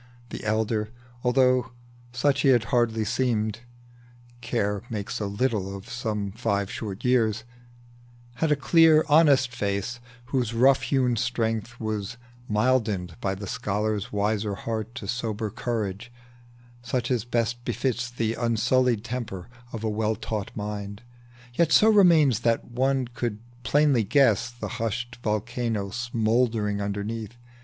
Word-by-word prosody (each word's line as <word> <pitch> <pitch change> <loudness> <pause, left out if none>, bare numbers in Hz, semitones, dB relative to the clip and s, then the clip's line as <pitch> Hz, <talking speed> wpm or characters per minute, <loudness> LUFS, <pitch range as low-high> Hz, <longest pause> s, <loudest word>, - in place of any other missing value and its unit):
The - - -7
elder, 110 0 0 0.3
although 130 0 +3 0.4
he 135 0 +3
hardly 115 0 0
seemed, 110 -2 0 0.8
(Care 105 -4 -1
makes 105 -3 -4
so 105 - -2
little 100 -2 -1
of 100 +3 -13
some 105 -5 -3
five 100 -2 -1
short 105 0 -6
years,) 110 -4 +2 0.9
Had 160 +2 +1
a - - +5
clear, 160 +2 +5
honest 140 -5 +5
face, 100 +4 -2 0.3
whose 125 -3 -1
rough 135 +3 +5
hewn 125 -4 +1
strength 115 0 -2
Was 110 0 -3 0.3
mildened 105 -6 +1
by 95 -1 -1
the 100 +1 -7
scholar's 105 -1 -2
wiser 105 0 0
heart 110 +3 -4
To 105 - -6
sober 110 -2 -2
courage, 115 0 -3 0.7
such 120 0 -2
as 120 -4 +1
best 120 0 -1
befits 125 -1 -1
The 115 -2 -1
unsullied 120 0 +1
temper 120 -6 -5 0.2
of 115 -1 -6
a - - 0
well 110 +1 0
taught 105 -2 -4
mind, 105 0 -5 0.5
Yet 160 +5 +2
so 220 - +6
remained 170 - +6
that 115 -1 +1
one 130 +1 0
could 120 -3 -3 0.2
plainly 140 -1 +3
guess 120 0 +3
The 120 0 -7
hushed 115 +2 -3
volcano 110 -2 -2
smouldering 115 -3 0
underneath. 105 +3 -4
115 Hz, 130 wpm, -26 LUFS, 105-125 Hz, 0.9 s, so